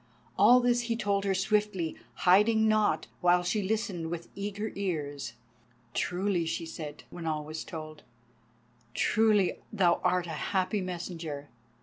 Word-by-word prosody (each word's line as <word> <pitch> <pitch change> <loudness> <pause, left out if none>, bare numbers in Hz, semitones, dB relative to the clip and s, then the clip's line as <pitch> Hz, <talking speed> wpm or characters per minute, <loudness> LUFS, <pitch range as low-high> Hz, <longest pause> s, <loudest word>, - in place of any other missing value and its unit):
All 250 +1 +7
this 245 0 +3
he 230 - +2
told 200 -3 0
her 195 -1 +1
swiftly, 195 -3 0 0.3
hiding 215 +4 +5
naught, 215 -1 +2
while 180 0 +4
she 195 +4 0
listened 195 -5 -2
with 170 0 -5
eager 205 +2 -4
ears. 145 -10 -3 0.6
"Truly," 180 -2 0
she 165 - -2
said, 150 -2 -7
when 170 -2 -6
all 155 -1 -1
was 155 +1 -5
told, 155 -1 -8 0.9
"truly 215 -4 +3
thou 185 -5 +3
art 180 -1 +2
a - - -8 0.3
happy 185 +2 +1
messenger. 165 -5 -5
185 Hz, 135 wpm, -29 LUFS, 165-210 Hz, 0.9 s, All